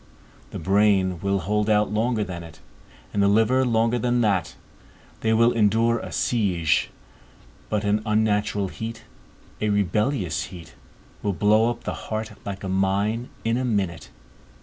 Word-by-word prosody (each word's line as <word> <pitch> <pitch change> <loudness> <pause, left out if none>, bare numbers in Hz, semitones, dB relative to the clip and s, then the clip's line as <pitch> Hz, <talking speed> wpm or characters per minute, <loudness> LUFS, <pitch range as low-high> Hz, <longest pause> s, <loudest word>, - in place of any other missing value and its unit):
The - - -7
brain 95 -1 +2
will 100 +1 0
hold 105 +4 0
out 105 -1 +3
longer 110 0 +1
than 90 -3 -6
it, 80 -2 -12 0.5
and 100 - +1
the 100 - +4
liver 110 +6 +3
longer 115 0 +1
than 120 0 +1
that; 95 -7 0 0.6
they 110 - 0
will 115 +2 +4
endure 115 +1 +2
a - - -7
siege; 90 -10 +1 0.8
but 105 -1 -1
an 105 +1 +1
unnatural 105 -2 +1
heat, 115 +2 -7 0.6
a 105 - +1
rebellious 105 - 0
heat, 90 -3 -11 0.5
will 100 - -1
blow 105 +5 +3
up 120 0 -5
the - - -3 0.2
heart, 110 0 -3
like 100 -1 -6
a - - -3
mine, 100 +5 0 0.2
in 115 +1 +1
a 130 - -1
minute. 95 -9 -2
105 Hz, 150 wpm, -24 LUFS, 95-115 Hz, 0.8 s, the